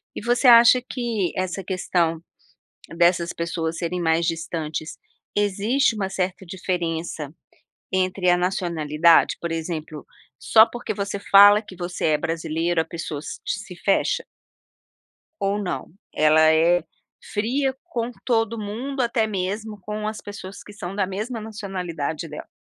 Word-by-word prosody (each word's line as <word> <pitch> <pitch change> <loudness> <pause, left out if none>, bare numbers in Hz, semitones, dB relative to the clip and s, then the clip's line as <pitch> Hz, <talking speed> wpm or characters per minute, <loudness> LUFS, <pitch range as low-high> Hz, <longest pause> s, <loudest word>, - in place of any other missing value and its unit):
E - - -4
você 240 +3 +1
acha 235 +1 +8
que, 235 -7 -2
essa 185 0 -3
questão, 175 -3 0 0.8
dessas 170 0 +3
pessoas 165 -1 -3
serem 175 +1 -2
mais 165 0 +2
distantes, 160 -1 -4 0.4
existe 210 +5 +2
um 190 - 0
certa 190 0 -2
diferença 170 -4 -3 0.6
entre 185 -1 +1
a 175 - +5
nacionalidade, 170 -3 +2
por 170 - -3
exemplo, 160 -2 -5 0.3
só 220 0 +6
porque 240 0 -5
você 200 0 -3
fala 205 +1 +7
que 195 -4 -13
você 175 -1 -3
é 150 - +2
brasileira 165 +1 -1
a - - -9
pessoa 160 -3 -5
se - - -8
te - - -2
se 185 -4 -10
fecha? 195 - +1 1.2
Ou 200 +1 +1
não? 180 -10 -4 0.3
Ela 155 +1 +5
é 170 +2 +3 0.5
fria 260 +6 0
com 245 -8 -4
todo 230 -2 +1
mundo, 235 +6 -4
até 230 -2 +1
mesmo 210 +2 -3
com 210 +2 -5
as 215 -1 -4
pessoas 200 -1 -9
que 210 - -13
são 195 -2 -7
da 200 -2 +1
mesma 215 +5 -4
nacionalidade 180 -7 -4
dela. 150 - -8
185 Hz, 140 wpm, -23 LUFS, 165-215 Hz, 1.2 s, acha